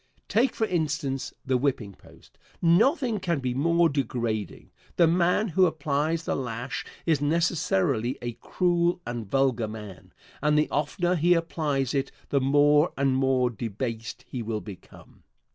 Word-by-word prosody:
Take, 235 +3 +2
for 220 - +1
instance, 150 -7 -2
the 130 -1 +2
whipping 125 -7 -1
post. - - -20 0.2
Nothing 225 - +3
can 170 -3 -1
be 130 -2 -2
more 170 +5 +3
degrading. 120 -7 -3 0.2
The 170 - +5
man 180 +5 +2
who 185 +2 +4
applies 155 +1 -1
the - - -1
lash 125 0 -4 0.2
is 155 -4 +2
necessarily 165 - +1
a 120 - -4
cruel 175 +6 0
and 120 -4 -5
vulgar 130 -3 +1
man, 105 -3 -10 0.3
and 150 +1 +2
the 150 - +1
oftener 175 +5 0
he 175 +1 +3
applies 150 -6 -1
it 135 -1 -1 0.2
the 140 - +2
more 145 +4 +4
and 135 -1 +2
more 130 -2 +2
debased 115 +1 -5
he 125 - -5
will 110 -1 -3
become. 100 -4 -13
145 Hz, 145 wpm, -26 LUFS, 125-170 Hz, 0.3 s, The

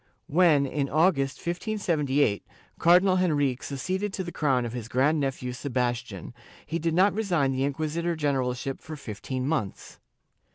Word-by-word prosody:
When, 155 -3 +4
in 140 0 -2
August, 150 -4 +2
1578, 165 - 0 0.4
Cardinal 180 +2 +5
Henrique 145 -8 +1
succeeded 185 +9 -3
to 190 - -3
the 175 - -6
crown 135 -7 +1
of 115 - -5
his 120 -3 -5
grand 140 +6 +2
nephew 130 -3 -2
Sebastian, 120 - -3 0.3
he 165 - -3
did 165 -1 -1
not 190 +3 +4
resign 175 -11 +1
the 130 0 -2
inqui 155 +3 -3
sitor 170 +2 -2
generalship 135 -3 -1
for 155 - -8
fifteen 130 +1 -5
months. 140 -11 -3
145 Hz, 150 wpm, -27 LUFS, 130-170 Hz, 0.4 s, Cardinal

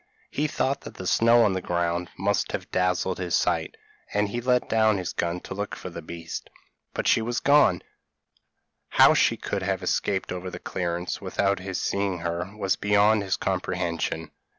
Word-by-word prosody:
He 150 +2 0
thought 140 -1 -1
that - - -10
the 95 - -7
snow 115 +5 +5
on 105 - +3
the 95 - -2
ground 85 0 -1
must 100 +1 0
have - - -4
dazzled 90 0 0
his 90 -3 0
sight, - - 0 0.3
and 105 0 +1
he 120 +4 -3
let 125 0 +2
down 110 -2 +3
his 90 -2 -4
gun 85 +1 -1
to - - -7
look 100 +1 -4
for 90 - -8
the 85 - -7
beast 85 +1 -7 0.5
but - - -1
she - - +4
was 120 +2 -1
gone; 145 +1 +4 1.1
how - - +7
she - - +3
could 100 - -3
have 95 0 -1
escaped 95 +1 0
over 90 0 -4
the - - -7
clearance, 85 -1 -3
without 100 0 0
his 95 0 -4
seeing 100 -2 -1
her, 85 +2 -3
was 95 -2 +1
beyond 105 +1 +4
his 95 -2 -1
comprehension. 85 -1 -2
95 Hz, 180 wpm, -26 LUFS, 90-105 Hz, 1.1 s, how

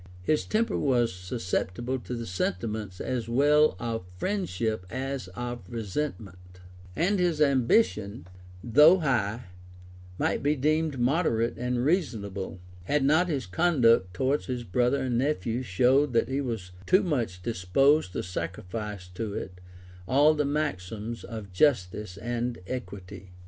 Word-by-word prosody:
His 150 +10 +1
temper 225 +2 0
was 120 -6 +2
susceptible 90 +4 -3
of 130 -3 -4
the 120 -2 -4
sentiments 95 +1 -3
as 120 -3 -3
well 145 +2 +4
of 115 -1 -3
friendship 110 - -2
as 135 -1 -4
of 120 +1 -4
resentment; 100 -6 -5 0.4
and 190 +4 +1
his 175 -4 +1
ambition, 130 - +2 0.4
though 150 +9 +7
high, 120 - 0 0.7
might - - 0
be 145 +2 +2
deemed 155 +1 +1
moderate 120 -3 +1
and 125 0 -1
reasonable, 100 - -1 0.3
had 145 +7 +1
not 160 +6 +4
his 140 -5 -1
conduct 115 - +3
towards 135 +8 0
his 125 -2 -3
brother 125 +7 +1
and 120 -2 0
nephew 125 -4 0
showed 130 +5 +2
that 115 - +2
he 135 +2 0
was 110 -9 -4 0.2
too 185 +3 +5
much 120 - -2
disposed 115 - +2
to - - -2
sacrifice 95 +3 -5
to 100 +3 -5
it 90 -1 -6 0.5
all 145 +7 +5
the 150 -1 0
maxims 115 -6 -3
of 105 -4 -8
justice 95 -5 +1
and 120 +2 -2
equity. 95 -6 -7
120 Hz, 135 wpm, -27 LUFS, 100-145 Hz, 0.7 s, though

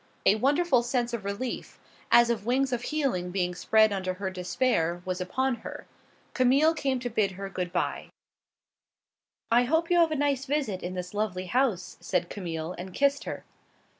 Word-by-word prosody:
A - - +7
wonderful 275 +4 +3
sense 240 0 -1
of 230 -4 -3
relief, 200 +6 -4 0.3
as 235 0 +6
of 220 -4 -2
wings 260 +1 +1
of 240 - -1
healing 245 -11 -1
being 180 -1 -1
spread 215 +4 +3
under 185 -1 -2
her 190 0 -3
despair, 180 -2 0
was 185 0 -3
upon 260 +7 0
her. - - -8 0.5
Camille 275 +5 +4
came 275 -4 -1
to 245 - -2
bid 205 -3 +1
her 195 +1 -7
good 180 -2 -3
by. - - -2 1.4
"I 240 +1 +5
hope 325 +6 +1
you 350 - +5
have 335 -1 +5
a 310 - -1
nice 280 -2 0
visit 270 -10 -1
in 180 +1 -5
this 180 +1 -5
lovely 205 -3 -2
house," 185 -5 0
said 180 -2 -1
Camille, 170 -3 -4
and 185 0 -7
kissed 280 0 +2
her. - - -6
220 Hz, 175 wpm, -28 LUFS, 185-265 Hz, 1.4 s, A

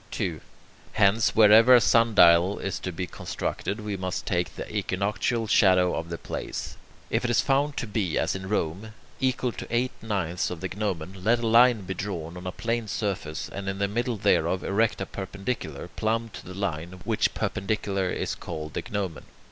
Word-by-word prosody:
2. - - -3 0.5
Hence, 110 +1 +3
wherever 115 +3 +8
a - - +8
sundial 100 -6 +5
is 100 - -3
to 95 - -4
be 90 +2 -3
constructed, 100 +4 -4
we 105 -1 -3
must 95 -1 -3
take 85 -3 -1
the - - -6
equinoctial 105 +4 -1
shadow 90 -4 +4
of 80 +1 -4
the 85 - -4
place. - - -5 0.4
If - - +1
it 125 - 0
is 120 - +3
found 140 +1 +1
to - - -1
be, 105 -6 -1
as - - +1
in 95 0 -6
Rome, 105 +2 -2 0.3
equal 130 -1 0
to - - -8
eight 120 +2 +1
ninths 95 -5 -1
of 90 - -6
the 95 +2 -4
gnomon, 95 -2 -4
let 115 +4 +4
a 120 - -3
line 120 0 +6
be 95 0 -4
drawn 85 -4 -5
on 90 +1 -7
a - - -2
plane 115 +2 -2
surface, 95 -6 -3
and 100 -1 -5
in 95 - -3
the 100 0 +1
middle 120 +3 -1
thereof 95 -1 +2
erect 105 +1 +1
a - - -1
perpendicular, 95 - -5
plumb 115 +5 -1
to - - -9
the 90 - -8
line, 90 -2 -4
which - - +1
perpendicular 100 -1 -1
is - - -2
called 75 -2 -6
the - - -2
gnomon. 95 -6 -3
100 Hz, 190 wpm, -26 LUFS, 90-115 Hz, 0.5 s, wherever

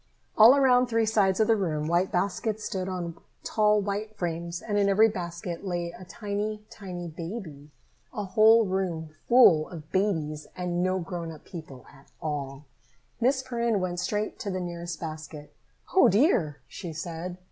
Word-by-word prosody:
All 225 +5 +9
around 255 -2 +4
three 230 -1 +1
sides 205 -3 +2
of 220 - +5
the 225 - +5
room 155 -7 -1
white 175 +3 +1
baskets 205 +4 -1
stood 190 -2 -3
on 170 -3 -5 0.2
tall 210 -1 +3
white 205 +2 -3
frames, 170 0 -3
and 210 - -4
in 200 -1 +3
every 215 +3 +6
basket 175 -3 -5
lay 175 -3 -2
a 185 +2 -12
tiny, 210 +2 -4
tiny 180 -3 -7
baby. 165 -3 -7 0.4
A 210 -4 -4
whole 220 +4 +5
room 180 -5 -2 0.2
full 210 -11 +6
of 155 -3 -10
babies 160 -6 -1
and 180 -1 -1
no 185 +1 +1
grown 170 -3 -5
people 155 -7 -10
at 140 0 -19
all! 145 -2 -4 0.5
Miss 260 +3 +2
Perrin 235 -4 0
went 180 -1 -2
straight 210 +2 -2
to 205 - -4
the 185 -1 -2
nearest 170 -1 -5
basket. 155 -2 -8 0.4
"O 375 - +6
dear!" 185 - +2
she 170 -4 -7
said. 170 +2 -5
185 Hz, 160 wpm, -27 LUFS, 165-210 Hz, 0.5 s, All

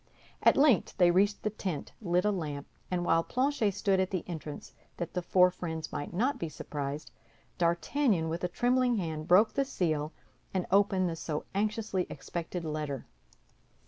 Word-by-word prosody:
At - - +5
length 275 -7 +4
they 175 -2 +6
reached 200 +3 +2
the 215 - 0
tent, 185 -7 -4
lit 180 -2 +1
a 210 - +4
lamp, 150 -7 -3 0.2
and 175 -1 -1
while 165 -1 +4
Planchet 255 -5 +1
stood 195 -3 +2
at 190 0 +1
the 185 -3 -2
entrance 155 -4 -7 0.2
that 170 -1 -4
the 180 - -1
four 180 +1 +4
friends 160 -3 -5
might 145 - -4
not 245 +11 0
be 165 - -3
surprised, 145 -1 -5 0.5
D'Artagnan, 175 - +2
with 165 +2 -3
a - - +2
trembling 245 +5 +2
hand, 160 -5 -3
broke 200 +5 +5
the 275 - +2
seal 155 - -1 0.4
and 185 - +1
opened 195 -2 +4
the 165 - -2
so 155 -2 -4
anxiously 210 -2 -1
expected 170 0 -5
letter. 150 -3 -3
180 Hz, 170 wpm, -30 LUFS, 160-205 Hz, 0.5 s, they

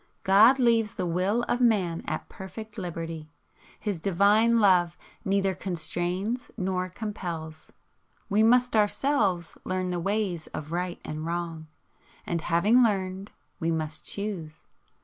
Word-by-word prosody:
God 215 +7 +6
leaves 230 -4 +2
the 185 - -2
WILL 185 +7 0
of 245 - -1
man 195 -8 +2
at 155 - -3
perfect 210 +3 -9
liberty. 165 -3 -5 0.5
His 200 -6 -3
Divine 205 +5 +4
Love 180 -4 +4 0.3
neither 195 0 +1
constrains 185 +6 -2
nor 185 -2 -1
compels. 175 -6 -6 0.6
We 205 +2 +2
must 245 +2 +4
Ourselves 205 - +1
learn 185 -1 -2
the 175 - -1
ways 195 -3 -1
of 155 +1 -6
Right 180 +1 -2
and 155 0 -5
Wrong, 165 -1 -4 0.6
and 170 -1 -2
having 200 +10 +3
learned, 195 -3 0 0.3
we 165 - -1
must 155 -1 -3
choose. 190 -7 -5
185 Hz, 130 wpm, -27 LUFS, 170-215 Hz, 0.6 s, God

